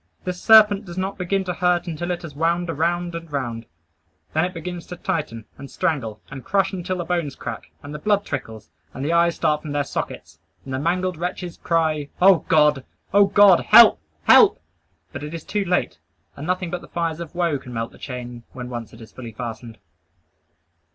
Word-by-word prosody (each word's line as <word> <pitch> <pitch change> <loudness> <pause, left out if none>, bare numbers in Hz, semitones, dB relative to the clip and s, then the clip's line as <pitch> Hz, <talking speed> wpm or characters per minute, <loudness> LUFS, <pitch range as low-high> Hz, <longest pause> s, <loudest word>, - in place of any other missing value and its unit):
This 180 -1 -4
serpent 215 -2 +6
does 175 -1 -9
not 190 +2 -3
begin 190 +2 0
to 180 -1 -3
hurt 180 0 +1
until 175 0 -4
it 175 -1 -3
has 160 -4 -8
wound 170 +3 0
around 175 +2 -1
and 165 -1 -7
round. 120 -5 -4 0.7
Then - - +2
it 180 - -5
begins 175 +1 -6
to 180 - -7
tighten, 155 - -3
and 140 0 -9
strangle, 135 -12 -2
and 135 -1 -8
crush 195 0 +1
until 185 0 -3
the 175 - -4
bones 170 -5 -2
crack, - - -7
and 145 +1 -8
the 150 - -6
blood 205 +4 +1
trickles, 110 -6 -6 0.2
and 135 - -4
the 165 - 0
eyes 170 0 +3
start 150 -2 +1
from 150 -2 -6
their 145 0 +1
sockets, - - -6 0.3
and 135 - -6
the 130 - -1
mangled 180 +3 -1
wretch 180 +2 -4 0.2
cries 160 -3 0
"O 190 0 +7
God! 150 -3 +3 0.3
O 200 0 +6
God! 195 -2 +6
Help! - - +7 0.2
Help!" - - +6 0.5
But 130 - -6
it 150 +2 -6
is 165 - -7
too 205 -2 -2
late; 180 0 -1 0.4
and 145 +3 -7
nothing 180 -1 -1
but 175 - -3
the - - -13
fires 165 -2 -2
of 170 -1 -8
woe 170 -5 0
can 125 - -11
melt 115 -1 -4
the - - -18
chain 125 -2 -7
when 125 -1 -7
once 120 -2 -7
it 115 - -14
is 110 - -12
fully 120 -3 -9
fastened. 115 0 -7
165 Hz, 205 wpm, -22 LUFS, 140-180 Hz, 0.7 s, O